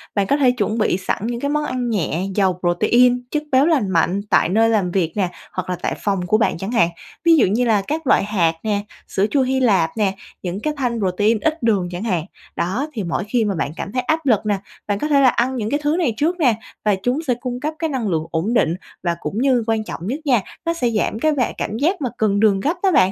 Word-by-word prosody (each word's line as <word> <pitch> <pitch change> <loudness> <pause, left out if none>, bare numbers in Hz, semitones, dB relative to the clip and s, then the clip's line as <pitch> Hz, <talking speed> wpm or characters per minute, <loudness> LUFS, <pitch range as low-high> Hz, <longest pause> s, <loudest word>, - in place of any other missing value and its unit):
Bạn 200 -2 +1
có 280 - +2
thể 265 -4 +4
chuẩn 220 -2 -1
bị 210 -5 +1
sẵn 190 +3 -2
những 240 0 -3
cái 280 - -2
món 300 +1 0
ăn 250 -3 -2
nhẹ, 185 -5 -1
giàu 190 -3 +2
protein, 245 +8 +3
chất 300 -1 -1
béo 265 +2 +5
lành 290 - +2
mạnh 180 +2 +1
tại - - +3
nơi 225 +4 +3
làm 200 -6 +1
việc 175 -3 0
nè, 190 -3 +1 0.2
hoặc 185 0 -4
là 180 - 0
tại - - -1
phòng 195 -3 0
của 215 - +3
bạn 220 - +1
chẳng 195 +5 -5
hạn. 225 -8 +3 0.4
Ví 335 -1 +7
dụ - - +5
như 225 +6 +1
là 215 -4 +3
các 310 0 -3
loại - - +4
hạt 180 -6 +1
nè, 210 -2 0 0.3
sữa 195 - +1
chua 280 - +3
Hy 260 0 +1
Lạp 195 -10 +3
nè, 200 -3 +1 0.3
những 180 +1 -4
cái 305 +7 -2
thanh 245 -4 -1
protein 205 +3 +1
ít 315 +3 -1
đường 205 -6 +2
chẳng 180 +3 -5
hạn. 180 -8 -1 0.3
Đó, 220 - -1
thì 220 -6 -3
mỗi 170 -2 -2
khi 220 +2 0
mà 200 -2 -1
bạn 160 -3 -2
cảm 195 - -5
thấy 255 - 0
áp 315 +5 -1
lực 225 -5 +2
nà, 205 -2 0 0.3
bạn 205 -1 -1
có 300 - -1
thể 285 -2 +4
là 260 - +6
ăn 245 +2 0
những 220 -3 -2
cái 290 +4 0
thứ 295 +2 +2
này 315 -10 +1
trước 345 +4 0
nè 250 -8 +4 0.3
và 210 -2 +3
chúng 250 +4 +1
sẽ 250 - +3
cung 245 0 -4
cấp 305 +4 -3
cái 320 - -1
năng 260 -6 -2
lượng 160 -3 0
ổn 170 +8 -1
định, 170 -8 +2 0.3
và 170 -2 0
cũng 200 - -5
như 255 -3 +3
quan 225 -1 +1
trọng 180 -4 -7
nhất 265 +7 -2
nha, 250 -7 +3 0.2
nó 335 - +1
sẽ 250 -8 0
giảm 220 -1 -1
cái 310 +5 +2
và 260 -4 0
cảm 215 - -3
giác 330 - 0
mà 255 - -1
cần 205 -2 +1
đường 205 -2 +4
gấp 300 +11 0
đó 385 - +4
bạn. 190 - +4
225 Hz, 265 wpm, -20 LUFS, 195-260 Hz, 0.4 s, Ví